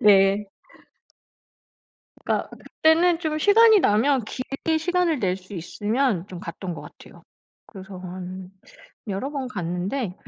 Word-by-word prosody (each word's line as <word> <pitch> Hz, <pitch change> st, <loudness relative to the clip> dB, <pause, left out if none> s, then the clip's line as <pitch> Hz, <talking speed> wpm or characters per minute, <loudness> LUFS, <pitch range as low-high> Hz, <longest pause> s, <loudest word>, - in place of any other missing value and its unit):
네. 200 Hz, 0 st, +5 dB, 1.8 s
그니까 -, -, -1 dB, 0.3 s
그때는 330 Hz, +2 st, +5 dB
좀 310 Hz, -2 st, -2 dB
시간이 430 Hz, +4 st, +6 dB
나면 255 Hz, +1 st, +3 dB
길게 275 Hz, +7 st, -2 dB
시간을 350 Hz, -3 st, +1 dB
낼 185 Hz, -2 st, +1 dB
수 190 Hz, +1 st, -12 dB
있으면 205 Hz, +3 st, -1 dB
좀 180 Hz, -2 st, -8 dB
갔던 175 Hz, +1 st, -6 dB
것 -, -, -9 dB
같아요. -, -, -15 dB, 0.4 s
그래서 190 Hz, -1 st, -10 dB
한 185 Hz, 0 st, -8 dB, 0.6 s
여러 200 Hz, +8 st, -3 dB
번 275 Hz, -3 st, -4 dB
갔는데 180 Hz, +3 st, -3 dB
210 Hz, 235 characters per minute, -24 LUFS, 185-310 Hz, 1.8 s, 시간이